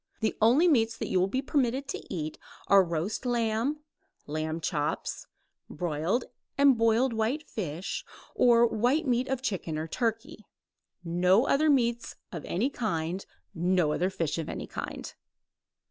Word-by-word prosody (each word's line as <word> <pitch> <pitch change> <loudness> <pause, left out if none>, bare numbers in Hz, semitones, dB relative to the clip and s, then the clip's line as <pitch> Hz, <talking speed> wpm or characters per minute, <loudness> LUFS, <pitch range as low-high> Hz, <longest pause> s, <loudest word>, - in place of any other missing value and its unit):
The 220 - 0
only 255 +11 +5
meats 230 -7 +3
that - - -4
you 185 - +2
will 185 - +3
be 260 +7 -2
permitted 270 -1 0
to - - -4
eat 155 -5 -4 0.3
are 200 -1 +6
roast 170 +6 -2
lamb, 240 +4 0 0.4
lamb 155 +2 -3
chops, 150 -2 -2 0.4
broiled 170 +8 -1 0.3
or 280 - +4
boiled 230 +2 +2
white 235 +8 -1
fish, 175 -3 -4 0.3
or 235 -1 +5
white 245 +8 +1
meat 250 -1 +1
of 265 -1 -2
chicken 180 -9 -2
or 155 +1 -3
turkey; 225 +1 -3 0.6
no 180 +7 +3
other 305 +3 +3
meats 235 -4 +1 0.2
of 165 -5 -6
any 235 +11 0
kind, 185 -6 -2 0.3
no 175 -2 +2
other 180 +4 +1
fish 165 -4 -2
of 160 - -4
any - - -5
kind. - - -6
220 Hz, 145 wpm, -28 LUFS, 170-245 Hz, 0.6 s, are